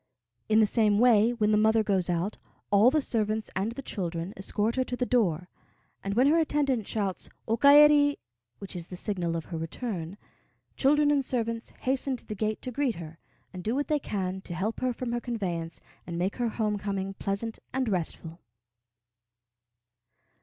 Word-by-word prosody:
In 215 0 +5
the 220 - +6
same 210 -1 +2
way, 230 -1 +5
when 215 -3 +1
the 210 - +4
mother 220 +1 +4
goes 190 -4 0
out, 175 +4 -1 0.3
all 205 +4 +6
the 300 +1 +1
servants 215 -2 -1
and 200 +5 -1
the 275 - -7
children 175 -4 -4
escort 210 +3 -1
her 260 - +3
to 250 - -3
the 250 - 0
door; 185 -9 +1 0.6
and 200 0 -2
when 250 +3 +4
her 310 +4 +4
attendant 280 -8 0
shouts 200 -4 -2 0.2
"O 225 - +2
kaeri," 290 +2 +6 0.4
which 195 -2 -9
is 175 -1 -5
the 180 - -8
signal 175 -3 -2
of 165 - -4
her 165 - -2
return, 175 +1 -5 0.6
children 290 +2 +3
and 285 -2 +2
servants 230 -2 -2
hasten 265 +1 0
to - - -11
the 215 - -5
gate 215 +1 -2
to 255 - -3
greet 265 -1 0
her, 165 -1 -9 0.3
and 180 -1 -7
do 225 +5 0
what 285 +1 -1
they 300 -1 +2
can 190 -6 -3
to 175 - -7
help 205 +6 -2
her 255 - 0
from 245 0 -4
her 240 0 -1
conveyance 180 -9 -4 0.3
and 170 -1 -4
make 185 +3 -1
her 240 -2 0
home 215 -2 -1
coming 195 -1 -3
pleasant 200 +4 -3
and 260 -1 -1
restful. 170 -3 -3
215 Hz, 185 wpm, -28 LUFS, 190-250 Hz, 0.6 s, the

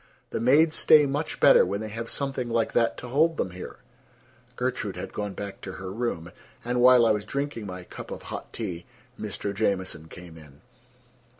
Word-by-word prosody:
The - - -2
maids 150 +6 +4
stay 150 -1 +6
much 145 +3 -3
better - - +7
when 100 - -2
they 110 0 -5
have 115 +2 -5
something 135 -3 -2
like 115 -1 +1
that 115 -1 +2
to 125 - -8
hold 155 +5 +3
them 95 - -1
here." 90 +1 -8 0.8
Gertrude - - -2
had - - -7
gone 105 -1 -3
back 100 -1 -7
to 95 - -7
her 95 0 -7
room, 100 -7 -3 0.3
and 125 0 0
while 125 -1 +7
I 115 - +5
was 105 -1 0
drinking 140 -6 -4
my 90 -1 -7
cup - - -10
of - - -7
hot - - -7
tea, 85 -1 -5 0.3
Mr. 100 -1 -4
Jamieson 95 -5 -1
came 85 -1 -12
in. 75 -2 -17
110 Hz, 190 wpm, -26 LUFS, 95-125 Hz, 0.8 s, better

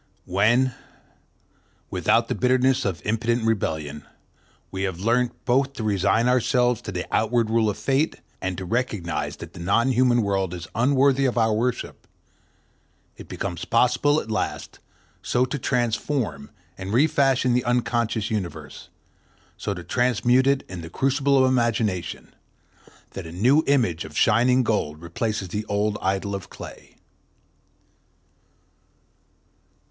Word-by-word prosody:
When, 120 +8 +2 1.2
without - - +2
the - - -1
bitterness 130 +1 +2
of 95 -4 -3
impotent 115 +2 0
rebellion, 80 -9 -2 0.7
we 95 - -4
have 95 -3 -2
learnt 120 +4 0
both 135 +2 +2
to 120 - -6
resign 105 +3 +2
ourselves 125 -1 +2
to - - -6
the 90 -1 -4
outward 110 0 +1
rule 115 -1 +3
of 100 - -3
Fate 140 +4 0 0.3
and 95 -2 -3
to 95 - -5
recognize 105 -5 -2
that - - -10
the - - -11
non 115 +9 +2
human 125 -1 +3
world 95 -3 -1
is 85 -1 -8
unworthy 135 +3 +3
of 125 -2 0
our 110 -1 +3
worship, 120 +3 -3 1.1
it - - -12
becomes 85 -1 -5
possible 125 +5 +2
at 110 - -7
last 110 - -3 0.4
so 125 +1 +1
to 135 +3 -4
transform 120 - -1 0.3
and 95 +2 -5
refashion 135 -2 +3
the 125 0 +1
unconscious 120 -3 0
universe, 85 -8 -5 0.7
so 100 - -4
to 90 - -8
transmute 125 +4 +2
it 140 -1 +2
in 90 -2 -7
the 80 - -8
crucible 135 - +1
of 130 -1 +5
imagination, 115 -7 -1 0.8
that 95 -4 -7
a - - -9
new 125 - +3
image 115 - +2
of 80 0 -9
shining 125 +4 +4
gold 75 -10 -1
replaces 95 +4 -3
the 105 +4 -3
old 105 0 0
idol 95 +1 -1
of 95 -2 -6
clay. - - -11
115 Hz, 135 wpm, -24 LUFS, 95-125 Hz, 1.2 s, of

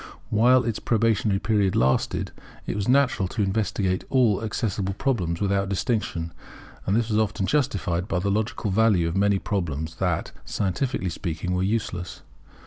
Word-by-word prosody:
While 125 +4 +5
its 115 -3 -2
probationary 110 -3 +2
period 100 -2 +1
lasted, 65 +1 +1 0.3
it - - -3
was 100 -1 -2
natural 130 -7 +3
to 105 +3 -1
investigate 95 -2 0
all 115 -6 +3
accessible 100 -3 -2
problems 95 -11 -1
without 100 -1 0
distinction; 95 -6 -1 0.5
and 100 - +2
this 115 0 +1
was 105 0 +2
often 105 -2 0
justified 100 - 0
by 95 - -1
the 100 +3 0
logical 105 0 -1
value 100 -4 +3
of 85 - -3
many 100 0 +3
problems 80 -5 -3
that, - - -1
scientifically 100 0 -1
speaking, 85 +1 -3
were 90 - 0
useless. 95 -3 -2
100 Hz, 150 wpm, -25 LUFS, 95-110 Hz, 0.5 s, While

